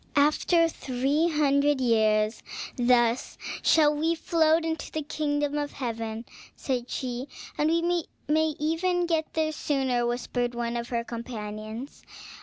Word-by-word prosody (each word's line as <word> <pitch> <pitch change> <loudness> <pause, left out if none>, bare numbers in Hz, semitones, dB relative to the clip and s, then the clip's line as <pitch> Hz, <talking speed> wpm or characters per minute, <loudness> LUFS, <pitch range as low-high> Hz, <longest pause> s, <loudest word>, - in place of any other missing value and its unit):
"After 305 +4 +4
three 285 +2 0
hundred 290 -2 +2
years, 220 -3 +2 0.3
thus 240 -1 +2 0.2
shall 300 -2 +5
we 325 +3 +1
float 320 -1 +2
into 320 -1 -3
the 310 - -3
kingdom 290 0 -1
of 290 0 -3
heaven," 230 -2 -4 0.3
said 250 -2 -3
she. 250 +1 -3 0.3
"And 300 +1 +1
we 335 0 +1 0.2
may 310 0 +2
even 350 +3 +1
get 325 -2 0
there 315 -1 +1
sooner," 265 -5 0
whispered 245 0 -2
one 235 0 -2
of 235 0 -3
her 235 -1 -1
companions. 225 +1 -6
280 Hz, 130 wpm, -27 LUFS, 240-315 Hz, 0.3 s, shall